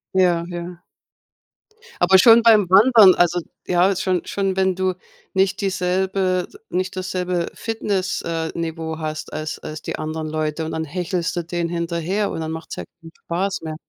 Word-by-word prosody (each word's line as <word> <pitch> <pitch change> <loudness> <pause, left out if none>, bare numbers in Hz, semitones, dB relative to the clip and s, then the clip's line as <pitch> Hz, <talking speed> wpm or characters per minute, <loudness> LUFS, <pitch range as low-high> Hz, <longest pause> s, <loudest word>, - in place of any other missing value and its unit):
Ja, 175 -3 +3
ja. 175 0 -7 1.2
Aber 190 - +6
schon 225 +4 +7
beim 215 -5 +5
Wandern 205 -1 +7
also 175 0 +2 0.3
ja, 180 +2 +3
schon 185 -1 -1
schon, 195 -1 -1
wenn 190 -1 +2
du 185 0 0 0.4
nicht 190 0 +1
dieselbe 185 -1 0 0.2
nicht 185 0 -2
dasselbe 180 -2 -2
Fitness 205 -4 -2
äh, 165 -1 -3
Niveau 160 -1 -4
hast 155 -1 -5
als 155 0 -4
als 155 0 -7
die - - -5
anderen 155 0 -4
Leute, 155 0 -2
und 160 - -5
dann 160 - -2
hechelst 175 +2 -2
du 175 - -2
denen 170 0 -3
hinterher 170 +4 -2
und - - -4
dann 160 0 -4
macht's 160 0 -6
ja - - -5 0.2
keinen 165 0 -12
Spaß 190 +3 -2
mehr. 155 -1 -5
180 Hz, 165 wpm, -21 LUFS, 165-190 Hz, 1.2 s, schon